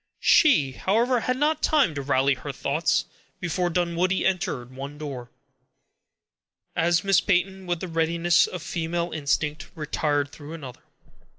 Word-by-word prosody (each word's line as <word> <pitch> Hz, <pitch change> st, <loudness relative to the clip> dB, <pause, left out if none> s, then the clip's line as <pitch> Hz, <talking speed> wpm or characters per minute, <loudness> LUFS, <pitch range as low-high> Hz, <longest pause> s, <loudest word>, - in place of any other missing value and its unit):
She, 245 Hz, -, +5 dB
however, 235 Hz, -, +1 dB
had 255 Hz, +2 st, -1 dB
not 300 Hz, +3 st, +1 dB
time 285 Hz, -, +3 dB
to 145 Hz, -, -4 dB
rally 135 Hz, 0 st, +2 dB
her 140 Hz, +2 st, -6 dB
thoughts, 145 Hz, +4 st, 0 dB, 0.3 s
before 175 Hz, 0 st, -1 dB
Dunwoodie 175 Hz, +2 st, 0 dB
entered 130 Hz, -10 st, -1 dB
one 140 Hz, +2 st, -7 dB
door, 135 Hz, -5 st, -7 dB, 1.5 s
as 170 Hz, +2 st, +2 dB
Miss 195 Hz, -2 st, +4 dB
Peyton, 190 Hz, 0 st, 0 dB
with 175 Hz, -2 st, -2 dB
the 185 Hz, -, -4 dB
readiness 170 Hz, +1 st, +2 dB
of 180 Hz, -, -7 dB
female 170 Hz, +1 st, -2 dB
instinct, 150 Hz, 0 st, -1 dB
retired 145 Hz, -2 st, -1 dB
through 145 Hz, +1 st, -10 dB
another. 135 Hz, -7 st, -9 dB
165 Hz, 135 wpm, -25 LUFS, 145-185 Hz, 1.5 s, She